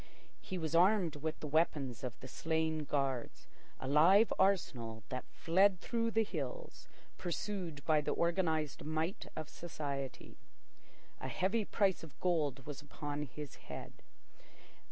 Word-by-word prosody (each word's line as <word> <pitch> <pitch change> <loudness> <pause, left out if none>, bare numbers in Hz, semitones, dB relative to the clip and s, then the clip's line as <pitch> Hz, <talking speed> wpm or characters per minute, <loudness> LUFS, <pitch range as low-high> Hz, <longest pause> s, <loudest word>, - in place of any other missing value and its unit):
He 185 - -4
was 160 -2 -2
armed 180 -2 +4
with 155 +2 -3
the 150 - -3
weapons 140 -5 +1
of 125 -2 -4
the 130 - -7
slain 160 +2 0
guards—a 135 -2 -3
live 175 +10 +6
arsenal 120 - +1
that 130 0 -4
fled 185 +2 +4
through 230 +2 0
the 225 0 +3
hills - - -5 0.3
pursued 175 -4 -3
by 155 -2 +4
the - - -1
organised 165 -4 +1
might 160 +6 -2
of 155 -2 -4
society. 145 -5 -5 0.8
A - - -4
heavy 200 +4 +1
price 195 -2 +2
of 155 -5 -12
gold 150 -7 +1
was 145 0 -6
upon 145 0 -4
his 145 +3 -7 0.2
head. - - -6
160 Hz, 135 wpm, -35 LUFS, 145-185 Hz, 0.8 s, live